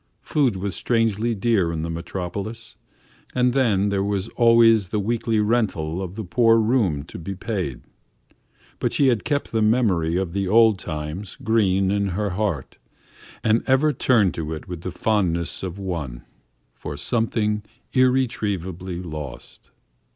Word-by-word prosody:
Food 135 -8 +1
was 95 0 -3
strangely 115 -1 +1
dear 100 -5 +1
in 80 -1 -3
the 85 - -3
Metropolis, 95 +6 -5 0.6
and 125 -1 +3
then 105 -7 +2
there 100 -1 0
was 100 +1 -2
always 115 -4 +5
the 105 - -1
weekly 115 +1 0
rental 100 -7 0
of 95 0 -6
the 110 - -4
poor 115 +4 +4
room 110 - +1
to 85 - -10
be 95 +4 -5
paid. 95 - -3 1.0
But - - -1
she 140 -2 +4
had 120 -4 +1
kept 145 -1 -1
the 110 - +1
memory 105 -8 +2
of 90 -3 -2
the 100 -1 -1
old 110 0 +5
times 75 +6 -5
green 95 -4 +2
in 100 0 +1
her 100 +2 -2
heart, 90 -8 -3 0.6
and 110 +1 +3
ever 140 +3 +3
turned 110 - +3
to 80 -1 -4
it 80 - -8
with 90 -2 -6
the 95 - -4
fondness 90 -4 0
of 95 -1 -5
one 85 -11 -5 0.5
for 75 - -7
something 105 - 0 0.3
irretrievably 100 -9 0
lost. 75 -6 -8
100 Hz, 150 wpm, -23 LUFS, 90-115 Hz, 1.0 s, always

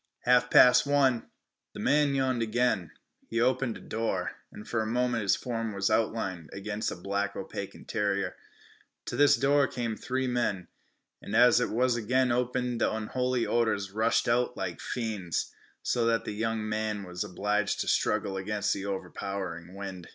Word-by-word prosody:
"Half 125 0 +4
past 125 +2 +7
one." 135 -4 +2 0.5
The - - -7
man 145 -1 +3
yawned 130 -3 +1
again. 110 -6 +1 0.4
He 115 - -2
opened 125 -1 +1
a - - -14
door, 115 0 -2 0.2
and 105 - -11
for 120 - 0
a 110 - -2
moment 120 0 0
his 100 - +3
form 115 -3 -3
was 100 +2 0
outlined 100 -7 -1
against 105 +2 -3
a - - -5
black, 100 +3 -2
opaque - - -6
interior. 100 -2 -2 0.7
To - - -4
this 145 0 +6
door 140 0 +3
came 120 -3 -3
the - - -17
three 130 +1 -1
men, 120 -8 -1 0.5
and 105 - -5
as 120 +1 +6
it 125 - 0
was 125 +2 +2
again 125 +3 +1
opened 125 0 -1
the - - +3
unholy 125 +3 -1
odors 110 -5 0
rushed 110 +3 +1
out 125 +1 +1
like 90 -3 -4
fiends, 105 -9 -3 0.3
so 120 -1 +1
that 115 0 +1
the - - -4
young 110 0 -2
man 110 -1 -2
was 90 0 -4
obliged 105 +1 -1
to - - -3
struggle 95 -1 +1
as - - -3
against 105 +1 -1
an 100 0 -5
overpowering 95 -2 -5
wind. 95 -3 -7
110 Hz, 175 wpm, -29 LUFS, 100-125 Hz, 0.7 s, past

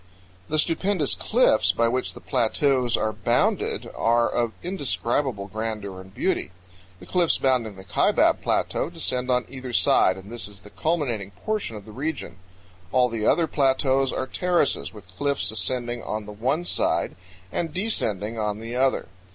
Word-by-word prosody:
The 155 - 0
stupendous 165 0 +2
cliffs 225 - +3
by 115 - +2
which 125 +2 -1
the - - -9
plateaus 125 0 +1
are 110 0 0
bounded 105 +1 +1
are 115 +1 +3
of 120 -2 0
indescribable 135 - -1
grandeur 105 -2 -4
and 95 0 -14
beauty. 95 - -1 0.5
The 90 - -12
cliffs 175 - +2
bounding 125 -6 +1
the 95 - -11
Kaibab 95 - +3
Plateau - - 0
descend 125 0 -2
on 125 -1 +2
either 130 -1 -7
side, 95 -5 +4
and 95 +3 -11
this 120 -5 -3
is 100 -1 -10
the 105 - -14
culminating 135 - -1 0.2
portion 215 - -1
of 100 - -11
the 110 - -11
region. 140 - -4 0.5
All 125 -1 +4
the 115 -2 -1
other 170 - +4
plateaus 135 -2 +2
are 130 - -2
terraces, 175 +2 +1
with 105 -4 -13
cliffs 140 -5 0
ascending 120 +4 -1
on 105 0 -4
the 105 - -8
one 130 +11 -1
side - - +1 0.4
and 165 -2 -2
descending 115 - -1
on 105 -1 -1
the 115 +2 -6
other. 130 +1 +1
120 Hz, 160 wpm, -25 LUFS, 110-140 Hz, 0.5 s, side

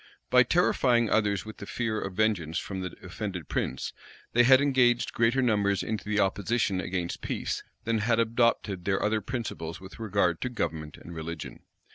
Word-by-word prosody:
By 125 - +7
terrifying 125 -5 +3
others 100 -4 +2
with 110 - -9
the 100 - -8
fear 110 -3 -2
of 95 -1 -5
vengeance 90 -7 +1
from 95 -1 -4
the 90 -2 -5
offended 95 -7 -5
prince, 65 - -2 0.4
they 120 - +6
had 130 +2 +7
engaged 130 -4 +3
greater 120 +3 +2
numbers 100 -4 +2
into 110 -1 -4
the 105 0 +1
opposition 100 0 +1
against 90 -1 -3
peace, - - -3 0.2
than 115 0 0
had 115 +2 +2
adopted 115 -5 +1
their 95 -1 +1
other 110 0 +1
principles 105 -10 -5
with 95 +3 -12
regard 100 -6 +1
to 125 - -1
government 80 -9 -3
and 85 - -10
religion. 80 -1 -6
105 Hz, 170 wpm, -28 LUFS, 90-120 Hz, 0.4 s, By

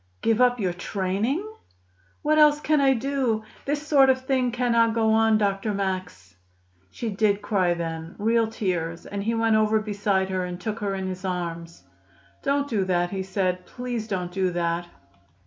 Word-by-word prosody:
"Give 225 +1 +2
up 245 -1 +4
your 185 -4 0
training?" 200 - -2 0.8
"What 310 +1 +3
else 300 -1 +6
can 300 -1 +2
I 270 -1 +4
do? 250 -3 -1 0.2
This 290 +1 -2
sort 275 -3 +5
of 260 0 +3
thing 260 -2 +1
cannot 235 -2 +2
go 220 -1 +3
on, 220 0 +4
Dr. 200 0 0
Max." 185 - -4 0.5
She 225 - -4
did 205 0 +1
cry 185 -4 +1
then 165 0 -5
real 225 +2 +2
tears; 175 -7 -3
and 200 0 -4
he 225 +3 -1
went 225 -1 +2
over 215 0 +3
beside 200 -2 0
her 185 -1 -1
and 180 0 -6
took 215 +4 -4
her 200 -2 -2
in 190 0 -3
his 185 0 -5
arms. 170 -2 -4 0.6
"Don't 280 +1 0
do 215 -7 0
that," 175 -1 0
he 195 -1 -2
said. 185 -1 -1
"Please 245 -3 -4
don't 180 -4 -3
do 190 0 0
that. 170 0 -1
210 Hz, 175 wpm, -25 LUFS, 185-235 Hz, 0.8 s, else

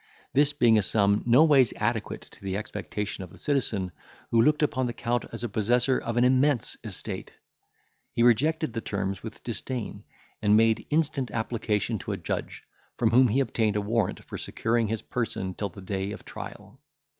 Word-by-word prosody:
This 145 +1 +4
being 120 -6 +4
a - - +3
sum 100 +1 +2
no 125 +6 +7
ways 140 -7 +5
adequate - - -1
to - - -18
the 95 0 -2
expectation 105 -1 -4
of 90 - -9
the - - -15
citizen, 110 -10 0 0.4
who 115 - +5
looked 150 +5 +3
upon 130 -4 +1
the 120 - -3
Count 120 0 -1
as 115 +1 -4
possessor 120 +4 +2
of 115 0 -4
an 120 - +4
immense 130 0 +3
estate, - - -6 0.8
he 115 - +1
rejected 140 +4 +3
the 115 - -3
terms 100 -2 -3
with 110 -1 -9
disdain, 120 -1 -4 0.4
and 105 0 +5
made 115 0 +3
instant 150 -4 +1
application 110 -2 -1
to - - -4
a - - -3
judge, - - -4 0.3
from 115 -2 +2
whom 125 +2 +6
he 125 +5 +2
obtained 110 -5 0
a 105 - +1
warrant 110 -1 -1
for - - -7
securing 115 0 0
his 110 0 -3
person 105 -6 -3
till 100 +2 -3
the 95 +2 -12
day 95 +1 -3
of - - -10
trial. - - -9
115 Hz, 180 wpm, -27 LUFS, 105-130 Hz, 0.8 s, no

